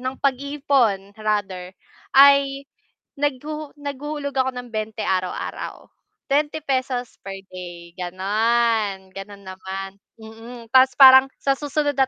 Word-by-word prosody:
ng 255 +1 -4
pag-iipon 270 -7 0
rather, 205 -4 -2 0.5
ay 275 0 +6 0.6
naghuhu 290 +1 -3
naghuhulog 285 0 -5
ako 260 0 +1
ng 245 0 -7
20 215 0 -4
araw-araw, 185 -1 -3 0.4
₱20 275 -4 -1
per 195 0 -6 0.2
day, 175 -2 -9
gano'n, 205 +2 0
ganon 200 0 -10
naman, 190 +1 -6 0.3
mm. 225 +1 -12
Tas 260 0 +7
parang 265 0 +9
sa 275 - +2
susunod 290 0 -1
na 265 -1 +3
245 Hz, 110 wpm, -22 LUFS, 195-275 Hz, 0.6 s, parang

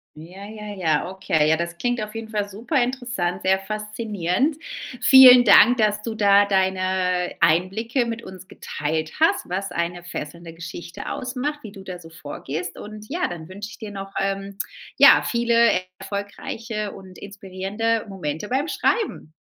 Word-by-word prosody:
Ja, 175 +6 -11
ja, 210 -1 -8
ja. 165 -2 0
Okay. 165 -5 0
Ja, 160 - +4
das 170 +1 -4
klingt 245 +3 -1
auf 215 0 -8
jeden 225 0 -5
Fall 205 -2 -2
super 240 - 0
interessant, 240 -8 -3
sehr 190 0 +3
faszinierend. 210 - -2 0.4
Vielen 255 -2 +9
Dank, 245 +3 +7
dass 210 -2 +1
du 225 0 -5
da 205 -1 +5
deine 185 -2 0
Einblicke 220 - +1
mit 230 0 -4
uns 185 -2 -12
geteilt 155 +2 -4
hast, 325 - +3
was 190 +1 -3
eine 175 0 -3
fesselnde 170 0 -7
Geschichte 170 0 -8
ausmacht, 270 +4 -3
wie 215 - -8
du 195 -1 -12
da 185 -2 -7
so 165 -2 -13
vorgehst. 160 +2 -6
Und 210 0 -9
ja, 355 +4 -1
dann 165 -2 -8
wünsche 200 +2 -8
ich - - -12
dir 215 -2 -8
noch, 195 -1 -7
ähm, 195 0 -3 0.4
ja, - - +8
viele 235 -3 +3 0.2
erfolgreiche 210 +1 -5
und 190 -1 -12
inspirierende 200 +3 -3
Momente 175 0 -5
beim 270 +5 0
Schreiben. 375 - -1
200 Hz, 155 wpm, -23 LUFS, 180-225 Hz, 0.4 s, Vielen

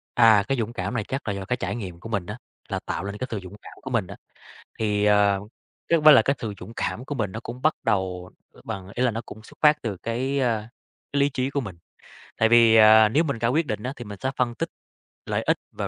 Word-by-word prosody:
À, 110 -4 +6
cái 135 - 0
dũng 115 0 -2
cảm 120 - -3
này 115 -3 -1
chắc 135 0 -4
là 100 - 0
do 100 -1 -5
cái 120 +5 -1
trải - - -3
nghiệm 95 -7 -7
của 115 - -9
mình 100 -5 -2
á, 105 +5 -6 0.3
là - - -2
tạo - - -3
nên 100 +1 -5
cái 130 - -4
sự 110 - -2
dũng 95 +2 -10
cảm - - -12
của 130 - -7
mình 115 -7 0
á. - - -9 0.6
Thì, 105 -2 0
ờ, 105 -1 +4 0.5
chắc 170 - +4
cũng 155 - -2
phải 155 -1 +10
là - - +7
cái 140 - 0
sự 110 -3 -5
dũng 115 - -9
cảm 125 - -3
của 145 - -5
mình 105 -7 -2
nó 110 - -5
cũng 120 +2 -8
bắt 155 +1 +3
đầu, 90 -2 -1 0.2
à, - - -18
bằng 95 -4 -6
ý 125 - -1
là 125 - +3
nó 115 0 -4
cũng 110 - -11
xuất - - -17
phát 150 -1 +4
từ 105 -5 -3
cái, 125 +7 -2
a, 115 -4 0 0.4
cái 140 - +1
lý 140 - +4
trí 130 0 -2
của 140 - -1
mình. 100 -9 -7 0.6
Tại 110 - +3
vì, 115 -1 +6
à, 110 0 +7
nếu 150 +9 +2
mình 140 -7 -2
ra 115 - +1
quyết 155 +7 +1
định 105 0 -3
á, 130 - -3
thì 120 - -9
mình 105 -1 -8
sẽ 130 - -1
phân 120 -2 0
tích - - -3 0.6
lợi - - -1
ích - - +2
và - - -4
115 Hz, 275 wpm, -24 LUFS, 105-130 Hz, 0.6 s, phải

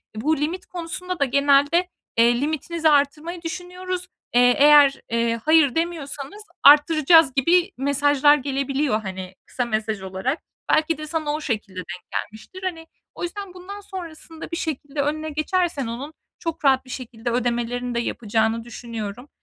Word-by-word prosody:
Bu 295 +8 0
limit 330 +6 -3
konusunda 360 +1 -5
da 280 - +3
genelde, 280 +6 +3 0.3
eee, 235 +1 +4
"Limitinizi 315 +2 0
artırmayı 300 +4 +1
düşünüyoruz. 360 +2 -5 0.3
Eee, 245 0 +6
eğer, 290 -1 +6
eee, 230 0 0
'hayır' 310 -4 +5
demiyorsanız 325 +2 -4 0.2
arttıracağız." 305 0 +6
gibi 345 +8 +3
mesajlar 285 +1 +4
gelebiliyor, 275 -3 -1
hani, 190 -2 -7
kısa 250 - -3
mesaj 215 -2 -2
olarak. 190 - -3 0.3
Belki 310 0 +2
de 305 0 -7
sana 305 -1 -2
o 305 - -3
şekilde 215 -8 -3
denk 180 0 -8
gelmiştir. 220 - -6
Hani, 330 -3 -4 0.3
o - - -7
yüzden 385 +1 -5
bundan 380 +3 -9
sonrasında 330 -4 -9
bir 335 - -2
şekilde 290 -3 -3
önüne 310 +2 -2
geçersen 310 -3 -1
onun 265 +7 -6 0.3
çok 330 -2 -4
rahat 265 -1 +4
bir - - -16
şekilde 240 -2 -5
ödemelerini 245 0 -1
de 235 - +1
yapacağını 225 0 -1
düşünüyorum. 230 +1 -7
285 Hz, 145 wpm, -23 LUFS, 240-330 Hz, 0.3 s, Eee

